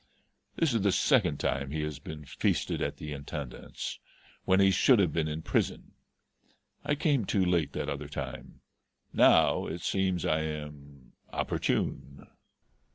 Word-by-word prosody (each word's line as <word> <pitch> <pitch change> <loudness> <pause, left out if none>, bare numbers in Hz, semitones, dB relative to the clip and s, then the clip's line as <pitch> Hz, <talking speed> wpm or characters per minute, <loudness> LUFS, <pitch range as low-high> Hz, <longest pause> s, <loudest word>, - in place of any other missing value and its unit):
This 160 -6 +1
is 115 - +1
the 100 0 +3
second 95 - +3
time 70 0 -1
he 75 +2 -2
has 75 -2 -4
been 75 -1 -8
feasted - - -1
at - - -2
the 75 -1 -6
Intendance 70 -2 -6 0.5
when 95 0 +4
he 95 0 +6
should 120 +7 +5
have 90 -7 +2
been 80 -2 0
in 80 +1 -4
prison. - - -1 0.9
I 145 0 +1
came 145 -5 +1
too 95 -1 +1
late 85 -4 +1
that - - -3
other 70 +1 -4
time; 65 -2 -7 0.5
now - - +5
it 85 +1 -5
seems 95 +1 0
I 80 -3 +2
am 75 -3 -7 0.2
opportune." 70 +1 -2
80 Hz, 150 wpm, -29 LUFS, 70-95 Hz, 0.9 s, he